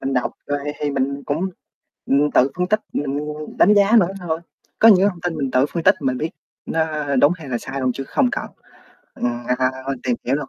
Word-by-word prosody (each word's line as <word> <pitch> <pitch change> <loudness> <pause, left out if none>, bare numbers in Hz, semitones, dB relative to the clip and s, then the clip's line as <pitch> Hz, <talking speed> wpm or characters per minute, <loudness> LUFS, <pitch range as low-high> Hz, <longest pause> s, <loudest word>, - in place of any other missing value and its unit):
Mình 135 0 -2
đọc 125 - 0
rồi 145 0 -1 0.2
thì 145 - -1
mình 140 +1 -1
cũng, 160 +6 -1 0.6
ừm, 145 +2 +2
tự 135 +2 +4
phân 180 0 0
tích, 215 +2 +2
mình 140 -1 -2 0.4
đánh 210 - +6
giá 205 +3 +5
nữa 175 - +3
thôi. 165 -3 -2 0.4
Có 225 - +7
những 205 - +8
cái 195 - +4
thông 175 -3 -10
tin 175 -2 -2
mình 135 -3 -2
tự 130 +2 +3
phân 170 - -2
tích 185 +2 +6
mình 130 -2 0
biết 160 +4 -2 0.4
nó 155 -3 -1
đúng 145 +5 +5
hay 160 -5 -11
là 120 - -1
sai 135 +3 -6
luôn, 130 - +1
chứ 135 - -5
không 125 - +2
cần, - - -3 0.7
ừm, 120 0 -3
à, 130 0 +2 0.3
tìm 125 -2 0
hiểu 130 - +1
luôn. 145 -2 -5
145 Hz, 230 wpm, -21 LUFS, 135-170 Hz, 0.7 s, những